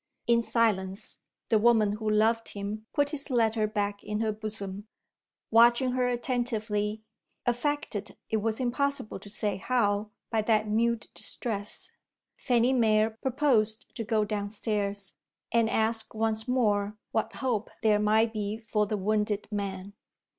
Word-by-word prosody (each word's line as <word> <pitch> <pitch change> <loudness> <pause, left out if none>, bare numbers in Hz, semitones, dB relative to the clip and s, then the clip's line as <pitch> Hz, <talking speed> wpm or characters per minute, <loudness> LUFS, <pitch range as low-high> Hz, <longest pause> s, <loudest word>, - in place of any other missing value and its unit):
In 235 0 +4
silence, 210 -4 0 0.3
the 220 - +4
woman 220 -2 +4
who 215 +1 -2
loved 225 +2 +2
him 210 +2 -5
put 285 0 +1
his 295 -1 -1
letter 225 -3 +2
back 205 -1 -2
in 210 0 -3
her 220 -1 +1
bosom. 210 -1 -6 0.6
Watching 235 +3 +5
her 250 0 +1
attentively 220 -4 -1 0.4
affected, 245 -4 -2
it 220 - 0
was 220 +1 -1
impossible 260 -3 -1
to 205 - -12
say 205 -1 -1
how, 210 -2 +1 0.2
by 225 -2 +2
that 215 0 +2
mute 230 +2 +1
distress 210 -3 -4 0.4
Fanny 245 0 +2
Mere 220 -3 +3
proposed 230 -2 +1
to 230 - -3
go 215 -1 +1
downstairs, 205 -1 -2 0.4
and 230 -1 +3
ask 220 0 +1
once 220 0 0
more 210 -5 +1
what 220 - -1
hope 235 -5 -1
there 210 -1 +4
might 220 +2 +3
be 210 0 -2
for 215 -2 -1
the 210 - -1
wounded 210 +1 0
man. 200 -1 -4
220 Hz, 140 wpm, -28 LUFS, 210-235 Hz, 0.6 s, Watching